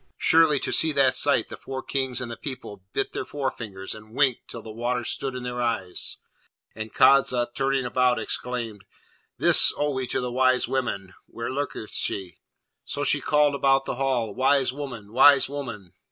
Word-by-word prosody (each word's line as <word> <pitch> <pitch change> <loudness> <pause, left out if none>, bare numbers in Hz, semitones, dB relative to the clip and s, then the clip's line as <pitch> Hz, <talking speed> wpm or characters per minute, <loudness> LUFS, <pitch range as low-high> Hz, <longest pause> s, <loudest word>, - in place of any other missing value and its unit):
Surely, 160 -3 +4
to - - -3
see 160 - +4
that 135 -3 +3
sight - - +2
the - - -8
four 130 0 -7
Kings 130 -3 -1
and 120 -2 -5
the - - -5
people 120 -9 -8
bit - - -2
their - - -3
forefingers, 115 -9 -5
and 110 +1 -14
winked 135 -4 +1
till 115 - -8
the 110 - -9
water 120 +2 -2
stood 135 +2 -4
in 125 - -6
their 125 0 -4
eyes, 110 -7 -2 0.6
and 110 0 -7
Kadza, 130 -3 +3
turning 135 0 -1
about, 125 0 +1
exclaimed, 115 -5 -4 0.5
'This - - +7
owe 145 0 0
we 130 -1 -3
to - - -1
the 125 -1 -4
wise 130 0 +2
woman! 100 -8 -3
where 115 +2 -6
lurketh 130 -5 -5
she?' 95 -4 -2 0.4
So - - -4
she - - +2
called 150 -1 +2
about 135 -1 +2
the - - -4
hall, 125 -6 -1
'wise 130 +2 +2
woman! 125 -7 -8
wise 135 +2 +6
woman!' 115 - -7
125 Hz, 180 wpm, -24 LUFS, 115-135 Hz, 0.6 s, This